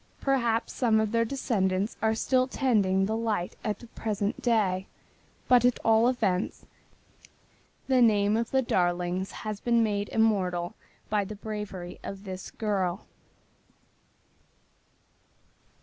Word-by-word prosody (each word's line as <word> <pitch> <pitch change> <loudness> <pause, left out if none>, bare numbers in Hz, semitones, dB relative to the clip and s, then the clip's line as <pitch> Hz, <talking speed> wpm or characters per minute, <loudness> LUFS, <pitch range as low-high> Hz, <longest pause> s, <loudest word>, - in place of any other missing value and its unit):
Perhaps 235 -4 0
some 225 -4 +2
of 220 -1 0
their 230 0 +2
descendants 210 -6 -1
are 220 0 +2
still 255 +2 +2
tending 200 -8 +2
the 220 +2 -1
light 220 -6 -2
at 210 -1 -1
the - - -13
present 210 -3 -3
day, 200 -6 +1 0.6
but 245 -1 +5
at 245 0 +3
all 225 +1 +5
events 210 -7 -1 1.2
the 260 -2 +3
name 210 -2 +4
of 230 +1 -1
the 265 0 +2
Darlings 180 -2 0 0.2
has 215 -1 -3
been 235 0 +2
made 205 -2 -1
immortal 185 -6 +1 0.4
by 210 -1 +2
the 210 +2 -7
bravery 205 -4 -6
of 195 0 -7
this 185 -2 -7
girl. 195 -4 -2
215 Hz, 125 wpm, -28 LUFS, 190-230 Hz, 1.2 s, but